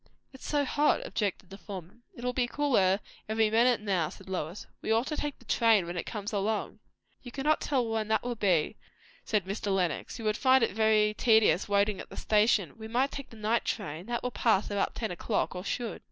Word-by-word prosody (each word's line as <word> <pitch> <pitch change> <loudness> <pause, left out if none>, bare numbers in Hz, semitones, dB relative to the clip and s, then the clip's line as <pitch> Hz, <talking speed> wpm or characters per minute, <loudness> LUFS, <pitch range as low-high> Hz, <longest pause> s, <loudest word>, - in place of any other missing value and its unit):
"It's 265 - -10
so 290 -1 +1
hot!" 295 +3 +2
objected 195 -4 -3
the 195 - -9
former. 190 -1 -9 0.2
"It 240 - -10
will 250 0 -1
be 245 -1 +1
cooler 220 -9 +2 0.3
every 220 0 +2
minute 235 +1 +4
now," 190 -7 0
said 195 - -13
Lois. 180 -1 -4 0.2
"We - - -2
ought 225 +3 +3
to 305 - -3
take 295 -1 -3
the 240 - -21
train 220 -4 +3
when 175 +1 -5
it 175 - -4
comes 210 0 -5
along 205 +2 -1 0.2
" - - -43
"You 245 - -9
cannot 295 +4 +1
tell 260 -5 0
when 220 -1 -1
that 220 0 +1
will 245 0 -2
be," 185 -9 +1 0.5
said 210 -4 0
Mr. 200 +2 -4
Lenox. 180 -5 -1
"You 225 - -7
would 215 0 +1
find 260 -2 +4
it - - +1
very 215 0 +3
tedious 220 -6 +3
waiting 200 -1 +2
at - - -8
the - - -11
station. 210 -3 +2
We 220 - -7
might 250 +5 +1
take 275 -1 -7
the 225 - -13
night 220 +2 +1
train. 180 -4 -4
That 240 0 -2
will 250 - -2
pass 215 -4 +1
about 200 -1 -1
ten 220 -4 -3
o'clock, 200 +4 -1
or 180 0 -6
should." 235 +3 -3
220 Hz, 225 wpm, -29 LUFS, 195-240 Hz, 0.5 s, minute